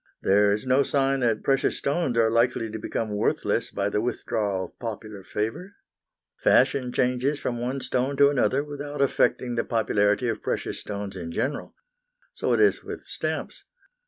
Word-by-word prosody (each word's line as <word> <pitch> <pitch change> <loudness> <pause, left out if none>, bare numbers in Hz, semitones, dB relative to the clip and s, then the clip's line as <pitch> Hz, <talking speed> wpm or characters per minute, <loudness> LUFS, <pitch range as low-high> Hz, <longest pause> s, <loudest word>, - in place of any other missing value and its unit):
There 100 +1 +4
is 105 +4 -1
no 130 +2 +4
sign 135 -1 +1
that 115 -4 +1
precious 135 -1 +1
stones 140 -4 0
are 110 -1 +4
likely 115 -1 +1
to 110 - -5
become 105 0 -3
worthless 105 - 0
by 100 - -1
the 105 - 0
withdrawal 105 -5 -1
of - - -17
popular 110 -3 -6
favour. 115 - -4 0.6
Fashion 125 -3 +3
changes 125 +4 +1
from 120 -1 -3
one 130 +3 -2
stone 130 +3 -1
to 140 0 +6
another 135 0 +2
without 145 0 -6
affecting 130 -2 +2
the 115 - 0
popularity 105 0 +1
of 115 - -2
precious - - -3
stones 100 -1 -6
in 85 -3 -6
general. 140 - -3 0.6
So - - -1
it - - +3
is 420 - +3
with - - -7
stamps. - - -4
120 Hz, 165 wpm, -25 LUFS, 105-135 Hz, 0.6 s, to